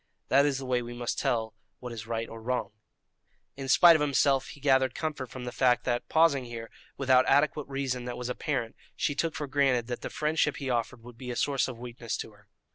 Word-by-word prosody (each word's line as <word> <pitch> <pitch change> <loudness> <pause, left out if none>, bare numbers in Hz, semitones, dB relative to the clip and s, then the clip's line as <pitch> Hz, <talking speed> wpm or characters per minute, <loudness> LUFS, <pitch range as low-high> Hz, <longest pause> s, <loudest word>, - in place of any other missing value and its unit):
That 140 +2 +5
is 140 -2 0
the 135 - -6
way 125 -1 +1
we 120 0 -7
must 120 0 -3
tell 110 -2 0 0.2
what 125 -1 -8
is 110 -1 -7
right 115 0 -2
or 115 0 -9
wrong." 115 -3 -2 0.8
In 135 -1 -6
spite 170 +5 +8
of 155 - +1
himself, 140 -2 +2
he - - -11
gathered 130 -2 +3
comfort 150 -5 -3
from 130 - -8
the 125 - -4
fact 125 -1 +2
that, 120 -1 -2
pausing 160 -5 +3
here, 115 -1 -8 0.3
without 130 -1 +4
adequate 150 0 +2
reason 135 -3 -3
that 125 -1 -5
was 125 - -4
apparent, 125 -2 -2 0.2
she 145 - 0
took 160 +3 -1
for 150 - -3
granted 135 -4 +2
that 120 - -4
the - - -5
friendship 155 +1 0
he 135 -3 -3
offered 120 0 -2
would 120 -1 -13
be 125 - -7
a 120 - -3
source 140 -1 +1
of 125 -3 -7
weakness 120 -1 -5
to - - -6
her. 105 0 -23
125 Hz, 225 wpm, -29 LUFS, 120-140 Hz, 0.8 s, spite